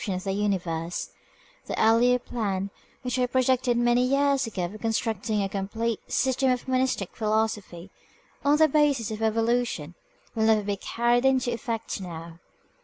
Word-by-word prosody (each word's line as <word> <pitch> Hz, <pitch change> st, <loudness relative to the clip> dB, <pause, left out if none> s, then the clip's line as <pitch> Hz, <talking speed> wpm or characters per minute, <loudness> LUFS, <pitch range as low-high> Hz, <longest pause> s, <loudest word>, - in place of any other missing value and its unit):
viii 195 Hz, -4 st, -2 dB
AUTHOR'S 185 Hz, -, -5 dB, 1.4 s
PREFACE 235 Hz, +3 st, +3 dB
plan, 200 Hz, -4 st, -2 dB, 0.3 s
which 250 Hz, 0 st, -2 dB
I 250 Hz, -, +2 dB
projected 255 Hz, -1 st, +2 dB
many 240 Hz, +1 st, +3 dB
years 275 Hz, 0 st, +2 dB
ago, 190 Hz, -5 st, -3 dB
of 205 Hz, +5 st, -8 dB
construct 225 Hz, -2 st, -1 dB
ing 210 Hz, -2 st, +1 dB
a -, -, 0 dB
complete 205 Hz, +4 st, -2 dB
"System 260 Hz, +1 st, +2 dB
of 250 Hz, 0 st, -1 dB
Monistic 255 Hz, -7 st, 0 dB
Philosophy" 210 Hz, -4 st, -2 dB, 0.5 s
on 285 Hz, +1 st, +4 dB
the 315 Hz, 0 st, +6 dB
basis 280 Hz, -7 st, +2 dB
of 215 Hz, 0 st, -5 dB
evolution 225 Hz, -7 st, 0 dB, 0.4 s
will 220 Hz, -2 st, +1 dB
never 220 Hz, -1 st, +4 dB
be 200 Hz, 0 st, -1 dB
carried 240 Hz, +4 st, +1 dB
into 260 Hz, -2 st, +2 dB
effect 230 Hz, -3 st, -4 dB
now. 165 Hz, -2 st, -8 dB
230 Hz, 145 wpm, -26 LUFS, 205-250 Hz, 1.4 s, the